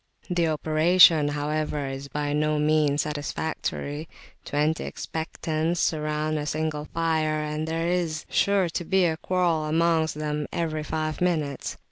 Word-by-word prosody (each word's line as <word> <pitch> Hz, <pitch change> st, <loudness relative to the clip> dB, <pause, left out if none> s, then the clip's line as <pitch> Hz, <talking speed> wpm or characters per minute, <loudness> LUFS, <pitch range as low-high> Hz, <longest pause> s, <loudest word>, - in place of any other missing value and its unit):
The 175 Hz, -2 st, +2 dB
operation, 155 Hz, 0 st, +5 dB
however, 150 Hz, 0 st, -2 dB
is 135 Hz, +1 st, -6 dB
by 145 Hz, +1 st, -2 dB
no 150 Hz, 0 st, +1 dB
means 150 Hz, -1 st, +2 dB
satisfactory; 150 Hz, 0 st, -4 dB, 0.3 s
twenty 150 Hz, +2 st, 0 dB
expectants 160 Hz, +1 st, -3 dB
surround 155 Hz, -1 st, 0 dB
the 150 Hz, -, -4 dB
single 155 Hz, -1 st, -2 dB
fire, 160 Hz, -2 st, 0 dB
and 150 Hz, +1 st, -3 dB
there 165 Hz, +1 st, -1 dB
is 170 Hz, -3 st, -1 dB
sure 200 Hz, -2 st, +2 dB
to 170 Hz, +1 st, -3 dB
be 190 Hz, +2 st, +2 dB
a 160 Hz, -2 st, 0 dB
quarrel 175 Hz, -3 st, 0 dB
amongst 160 Hz, 0 st, +2 dB
them 150 Hz, -1 st, -2 dB
every 155 Hz, -2 st, -2 dB
five 155 Hz, +1 st, -3 dB
minutes. 155 Hz, -6 st, -1 dB
155 Hz, 135 wpm, -26 LUFS, 150-165 Hz, 0.3 s, operation